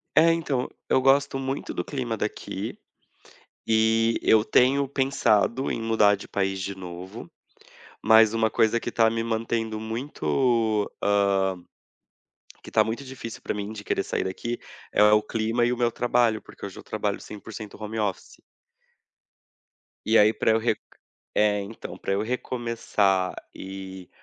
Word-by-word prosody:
É, 165 +2 +6
então 145 -6 -1 0.2
eu 130 - +4
gosto 135 +1 +3
muito 135 +1 -4
do - - -2
clima 125 -5 -3
daqui 105 +1 -4 0.9
e 115 +1 +3
eu 110 -1 +5
tenho 135 +4 +3
pensado 130 -2 +1
em - - -3
mudar 110 -2 +4
de 100 - -11
país 95 -1 -1
de 100 +1 -4
novo, 90 0 -9 0.7
mas 110 0 +6
uma 110 -1 +2
coisa 110 +2 +2
que - - -4
tá 115 -1 +4
me 115 0 -1
mantendo 115 -1 -2
muito, 115 -2 0
hã, 100 -2 +2 1.1
que - - -11
está - - +4
muito 115 +5 -4
difícil 130 -4 -8
para - - -3
mim 105 0 -4
de 105 -1 -9
querer - - 0
sair - - -2
daqui 120 +6 -4 0.3
é - - +4
o 105 0 +5
clima 115 +1 0
e 120 - +1
o - - -1
meu 120 -1 +2
trabalho, 120 -2 +2
porque - - -12
hoje - - -7
eu - - -9
trabalho - - -3
100% 105 0 -9
home 110 +1 -4
office. 100 -3 -3 1.7
E 110 +1 +4
aí 105 +1 +6
pra - - +1
eu 110 - +4
re 110 -1 +1 0.6
é 105 -1 +3
então 100 +3 -8
pra 100 - -3
eu 100 +2 +1
recomeçar 115 -6 0 0.2
e 95 -1 -8
110 Hz, 155 wpm, -25 LUFS, 105-120 Hz, 1.7 s, É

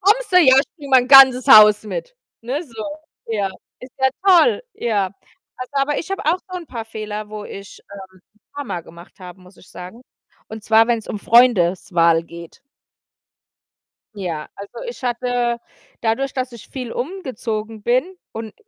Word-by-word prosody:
„Kommst 420 +3 +1
du - - +4
jetzt?“ 305 -7 +6
„Ja - - +6
ich 280 - -5
bringe 290 -4 -10
mein 255 -1 +4
ganzes 265 -2 +8
Haus 210 -1 +8
mit“, - - -7 0.3
ne, 265 +7 -3
so. 230 -9 -9 0.4
Ja, 205 -4 -2 0.3
ist 255 0 -12
ja 265 0 +3 0.2
toll. 395 +6 +4
Ja, 210 -5 -1 0.5
also, 255 0 -8
aber 280 +1 0
ich 340 - -7
habe 390 - -4
auch 330 +4 +1
so 365 - -5
‘n 345 - -8
paar 235 -5 -7
Fehler, 215 -1 -7
wo 210 -1 -8
ich, 195 -1 -11
ähm, 190 -2 -13
‘n 215 - -34
paar 285 - -5
mal 175 - -5
gemacht 170 +2 -16
habe, 180 0 -11
muss 185 +1 -19
ich - - -19
sagen, 185 +7 -11 0.5
und 220 0 -9
zwar, 225 0 +4
wenn‘s 230 -2 -2
um 210 - -4
Freundeswahl 180 -8 +3
geht. 170 0 -13 1.6
Ja, 170 -6 -5
also 200 0 -10
ich 475 - -11
hatte 245 -1 -1 0.4
dadurch, 240 +4 -1
dass 255 -1 -3
ich 235 -3 -13
viel 250 -4 -7
umgezogen 225 - -5
bin 250 +5 +1 0.3
und 220 -1 -8
230 Hz, 175 wpm, -19 LUFS, 205-265 Hz, 1.6 s, ganzes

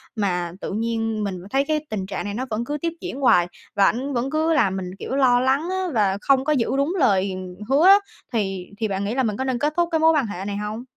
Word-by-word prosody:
mà 180 -5 -1
tự - - -4
nhiên 225 -1 -1
mình 195 -2 -2
thấy 275 +3 +1
cái 310 -1 -1
tình 210 -4 -3
trạng 190 +1 -5
này 205 - -4
nó 255 +4 -3
vẫn 225 +2 -2
cứ 295 +3 -3
tiếp 335 -1 -1
diễn 320 -7 -5
hoài, 175 -10 +4 0.3
và 200 - +5
ảnh 265 +5 0
vẫn 250 +2 -1
cứ 315 +2 +1
làm 220 -11 +2
mình, 185 0 -5
kiểu, 265 - -4
lo 255 -3 +4
lắng 270 +6 +1
á 375 0 -1
và 200 -4 +2
không 270 -1 +3
có 305 - +1
giữ 245 -6 +1
đúng 280 +5 +1
lời 195 -6 +2 0.3
hứa 285 +6 +4
á, 390 +1 +10 0.4
thì 195 -4 -1
thì 220 0 -1
bạn 195 0 -2
nghĩ 215 +4 -2
là 265 - +1
mình 210 -3 -1
có 265 - -1
nên 260 -2 -1
kết 300 +1 0
thúc 345 -1 +2
cái 320 - +2
mối 320 +1 +5
quan 290 -7 +1
hệ 195 -1 -6
này 200 0 -3
hông? 210 +3 -4
235 Hz, 270 wpm, -23 LUFS, 200-280 Hz, 0.4 s, á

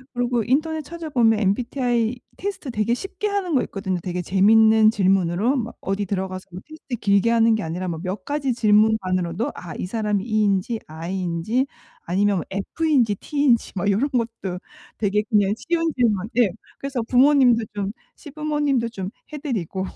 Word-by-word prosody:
그리고 245 -1 0
인터넷 310 +6 0
찾아보면 280 -9 +1
MBTI 240 +3 0 0.2
테스트 380 -9 -4
되게 225 +2 0
쉽게 390 +6 -4
하는 400 -4 -1
거 265 - +4
있거든요, 190 -3 -3
되게 180 0 -3
재밌는 220 +4 +5
질문으로. 195 +3 +2
막 235 -3 -3
어디 195 +1 -2
들어가서 185 -1 -3 0.2
테스트 310 -5 -7
길게 200 0 +2
하는 230 -1 +4
게 220 - 0
아니라 175 +3 -4
뭐 165 -2 -4
몇 185 +1 -5
가지 285 -3 -1
질문만으로도 210 -4 +2
아 170 -3 -8
이 - - -3
사람이 210 -1 -1
E인지 215 0 +1
I인지 175 - -2 0.4
아니면 195 +1 +1
F인지 235 +3 +1
T인지 280 -3 +1
막 195 +2 0
요런 245 +9 +1
것도 225 -7 -3 0.4
되게 210 -1 +1
그냥 205 -2 +3
쉬운 330 +4 -1
질문 215 -6 +1
예 230 -5 +5 0.3
그래서 275 -4 -3
부모님도 250 -2 +4
좀 200 -1 -2 0.2
시부모님도 295 -5 -1
좀 195 -3 -6 0.2
해 300 - -5
드리고 195 - -3
220 Hz, 350 characters per minute, -22 LUFS, 195-260 Hz, 0.4 s, 재밌는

